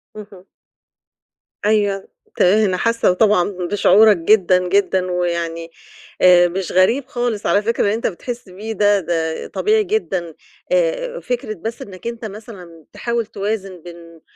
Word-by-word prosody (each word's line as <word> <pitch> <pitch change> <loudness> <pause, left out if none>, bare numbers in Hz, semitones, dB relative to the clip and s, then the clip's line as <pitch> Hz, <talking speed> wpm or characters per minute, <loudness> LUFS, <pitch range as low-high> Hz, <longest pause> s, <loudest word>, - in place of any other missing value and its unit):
اهم. 200 -3 -12 1.2
أيوه. 205 -2 +1 0.3
ت - - -1
أنا 190 0 +3
حاسّة 230 -4 +1
طبعًا 205 -2 +2
بشعورك 195 +2 +4
جدًا، 180 0 +3
جدًا 190 -1 +1
ويعني 170 -1 -3 0.5
آآ 180 -1 +6
مش 185 +1 -4
غريب 230 +9 +2
خالص 240 -5 -3
على 205 - +3
فكرة 230 +2 0
اللي 205 - +1
أنت 230 - -1
بتحس 235 +3 -7
بيه 210 +5 -7
ده، 205 0 +3
ده 160 -2 -3
طبيعي 430 0 +1
جدًا. 190 - -2 0.4
آآ - - 0
فكرة 245 -4 -4
بس 220 +5 -7
إنّك 195 +3 -9
أنت 235 -1 -6
مثلًا 190 -7 -11
تحاول 235 -1 -2
توازن 195 -4 -5
بين 170 -1 -13
200 Hz, 140 wpm, -19 LUFS, 180-225 Hz, 1.2 s, آآ